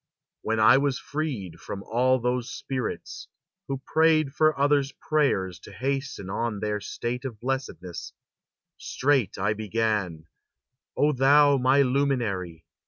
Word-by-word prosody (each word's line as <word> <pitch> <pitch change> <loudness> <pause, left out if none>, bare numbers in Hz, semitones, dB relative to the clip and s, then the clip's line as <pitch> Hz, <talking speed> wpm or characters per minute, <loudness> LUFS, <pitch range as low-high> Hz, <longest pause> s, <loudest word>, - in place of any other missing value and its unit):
When 110 0 -1
I 110 +5 +7
was 140 -1 0
freed 140 - -4
From 100 -1 -7
all 130 +3 +2
those 125 0 -1
spirits, 130 -3 -5 0.4
who 135 -1 -4
prayed 155 -3 +3
for 155 -1 +2
others' 140 -1 +2
prayers 115 - 0
To - - -13
hasten 135 -1 -3
on 105 +1 -2
their 105 0 -2
state 125 +5 -4
of 120 -6 -6
blessedness; 125 -8 -4 0.7
Straight 135 -7 0
I 100 +2 +1
began: 105 -6 -2 0.7
"O 150 +1 +3
thou, 140 +2 +5
my 130 +2 +4
luminary! 120 - -1
125 Hz, 125 wpm, -26 LUFS, 105-140 Hz, 0.7 s, I